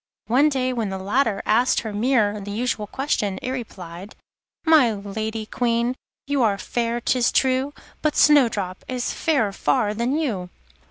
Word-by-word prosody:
One 270 +6 +4
day 255 -2 -1
when 225 -4 -2
the 190 - -4
latter 210 +2 0
asked 235 +4 +3
her 220 -2 -5
mirror 210 -2 +1
the 200 - -7
usual 215 0 -2
question, 210 -7 -1
it 255 - -2
replied: 190 -6 -7 0.5
'My 310 -8 +6
Lady 215 +2 -4
Queen, 235 +1 0 0.3
you 280 -1 0
are 210 -4 +2
fair, 235 +2 -2
'tis 245 0 +1
true, 265 +1 +1 0.3
But 305 -1 0
Snowdrop 225 -11 +3
is 250 -1 -2
fairer 275 -11 +1
far 195 +4 +1
than 240 +6 0
you. 210 - -2
230 Hz, 155 wpm, -23 LUFS, 205-260 Hz, 0.5 s, My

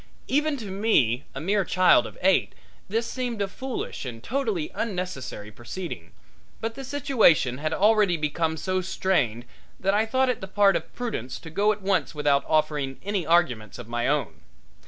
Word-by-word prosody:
Even 295 +1 +1
to 215 -6 -7
me, 145 - +2
a - - -3
mere 195 +6 +1
child 185 +1 +4
of - - -12
eight, 190 0 +3 0.3
this 225 +3 0
seemed 245 -2 -3
a 200 - 0
foolish 260 +6 -5
and 120 -3 -7
totally 225 - -1
unnecessary 180 - -4
proceeding, 120 - -7 0.5
but 225 0 -3
the 270 +3 -8
situation 240 - +3
had 155 +1 -1
already 210 -3 +3
become 160 +1 -1
so 185 +3 -1
strained 125 - 0 0.3
that 195 +1 +1
I 215 +2 +2
thought 260 +3 +2
it 250 - -1
the 190 - -5
part 200 0 +4
of - - -3
prudence 220 - -4
to 160 - -10
go 205 +5 +3
at 210 -2 -5
once 190 -4 0
without 145 -1 +2
offering 150 -3 0
any 200 -5 -1
arguments 140 -11 +2
of - - -9
my 120 0 -1
own. 145 +1 -1
185 Hz, 175 wpm, -26 LUFS, 145-215 Hz, 0.5 s, child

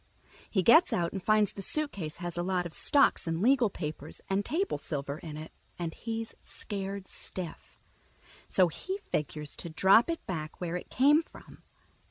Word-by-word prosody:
He 190 -4 +1
gets 320 - +7
out 170 -1 0
and 195 - -3
finds 215 +1 +3
the 195 - -7
suitcase 195 - 0
has 175 -1 -5
a 175 - -1
lot 180 0 0
of 170 - -6
stocks 275 - +3
and 165 0 -1
legal 245 +2 +4
papers 155 -4 -6
and 195 +1 +2
table 365 - -1
silver 140 -1 -4
in 155 -3 -7
it, 155 +1 -8 0.3
and 170 -2 -3
he's 225 -1 -4
scared 195 -1 -5
stiff. 180 -3 -6 0.7
So 185 -2 +4
he 375 - -4
figures 150 0 -2
to 170 - -4
drop 190 - +5
it 330 - -3
back 155 -4 -5
where 175 -1 -3
it 180 - -5
came 290 +5 +5
from. - - -15
185 Hz, 175 wpm, -30 LUFS, 165-225 Hz, 0.7 s, gets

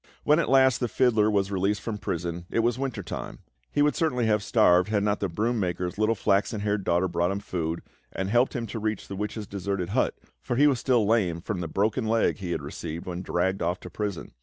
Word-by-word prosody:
When 150 +2 +4
at - - 0
last 130 -1 +5
the 120 - 0
fiddler 110 -3 +3
was 100 -2 +1
released 100 +2 0
from 110 -3 -4
prison, 85 -3 -4
it 115 - +1
was 120 +2 0
winter 135 -3 -3
time; - - -5
and - - -14 0.3
he 145 - +1
would 150 - +2
certainly 140 -8 +1
have 105 -1 +2
starved 90 -4 +4
had 105 -2 +1
not 105 0 +1
the 100 - -1
broom 110 +7 0
maker's 90 0 -2
little 110 +1 +2
flaxen 100 +1 +1
haired 105 -1 0
daughter 90 +2 +2
brought 85 0 0
him 100 - -1
food, 85 -5 -3 0.3
and 95 - -3
helped 120 +7 +2
him 120 -2 -2
to 115 - -5
reach 110 -1 -2
the 100 - -6
witch's 105 +2 -4
deserted 100 -2 -3
hut, 120 +6 +1 0.3
for 125 - -2
he 145 +4 +5
was 140 -4 +3
still 120 -4 +2
lame 100 -6 +2
from 95 +2 -4
the 85 - -3
broken 110 +7 0
leg 115 0 +2
he 95 -4 -6
had 85 - -2
received 80 +3 -6
when 90 -1 -4
dragged 95 +1 -1
off 85 +2 0
to - - -9
prison. 100 -4 -4
105 Hz, 235 wpm, -26 LUFS, 90-115 Hz, 0.3 s, last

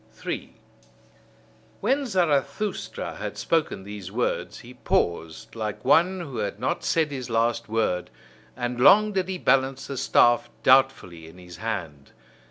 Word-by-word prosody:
3. - - -6 1.2
When 275 0 0
Zarathustra 175 - -1
had - - -6
spoken 160 -12 -1
these 100 -2 -8
words, 120 +4 -2
he - - -12
paused, 80 -2 -2
like 110 0 -5
one 175 +7 +3
who 140 -7 -7
had 100 0 -3
not 150 +9 -2
said 160 -3 +1
his 130 -3 -5
last 115 0 0
word; 110 -5 -1 0.5
and 120 0 -3
long 210 +9 +6
did 190 -3 -1
he 190 -1 -3
balance 135 -3 +1
the 140 - -6
staff 120 -1 +3
doubtfully 130 -11 +3
in 80 +3 -14
his 90 -2 -12
hand. 80 -11 -5
125 Hz, 140 wpm, -25 LUFS, 105-155 Hz, 1.2 s, long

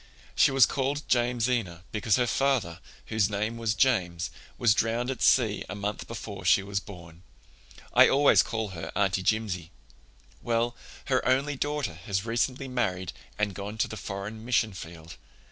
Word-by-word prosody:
She - - +5
was 135 -2 +6
called 140 +2 -2
Jamesina 120 -7 0
because 105 -1 +1
her 125 - +2
father, 120 -9 0 0.3
whose 110 -3 +1
name 105 +3 -2
was 115 -1 0
James, 95 -8 +1 0.3
was 115 -3 +4
drowned 115 +4 0
at 130 - -6
sea 110 -5 +3
a - - -4
month 105 +1 -4
before 105 -4 -7
she 100 - +4
was 100 0 -2
born. 85 -4 -12 0.7
I - - +7
always 140 +1 +5
call 110 -2 -3
her 80 -3 -7
Aunt 95 -1 +1
Jimsie. 95 -6 -1 0.7
Well, 120 0 0 0.3
her 130 -2 +1
only 135 +3 +1
daughter 145 - -2
has 95 +4 -3
recently 125 +3 -1
married 95 -9 -2 0.2
and 105 -2 0
gone 100 +3 -6
to - - +1
the - - -7
foreign 105 +2 -6
mission 115 -3 +1
field. 85 -2 -10
110 Hz, 160 wpm, -28 LUFS, 95-125 Hz, 0.7 s, I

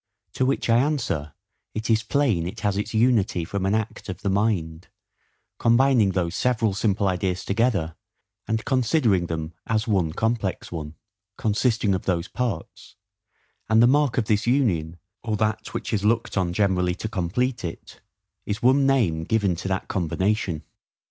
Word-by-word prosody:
To 130 - +1
which 135 - 0
I 115 0 +4
answer, 125 - -1 0.4
it 110 +1 -3
is 110 -1 +3
plain 115 -7 +1
it 90 - -7
has 100 -3 0
its 105 - -2
unity 110 -7 +2
from 95 +2 -2
an 100 - +2
act 110 -1 -4
of - - -6
the 100 - +1
mind, 95 -6 -1 0.7
combining 120 -4 +4
those 85 -2 -1
several 115 -2 +1
simple 100 0 +1
ideas 90 0 -1
together, 100 -7 0 0.5
and 110 0 -1
considering 120 - +2
them 80 0 -4
as 110 +1 0
one 95 -7 +1
complex 110 -1 -2
one, 80 -2 -6 0.4
consisting 110 -1 +1
of 95 - -3
those 90 -1 0
parts; 125 -3 -5 0.7
and 110 0 +5
the 120 - +7
mark 140 0 +3
of 120 - +2
this 105 +1 +1
union, 90 - +1 0.2
or 110 -3 -2
that 110 +1 -1
which - - -3
is 105 -2 0
looked 115 +2 +1
on 90 -3 +1
generally 90 -2 +1
to 110 - -4
complete 110 +6 -1
it, 85 -2 -8 0.4
is 105 +2 -4
one 135 +2 +4
NAME 100 -13 +2
given 100 -4 +1
to 90 - -5
that 95 0 -2
combination. 95 -1 -1
105 Hz, 160 wpm, -24 LUFS, 90-115 Hz, 0.7 s, the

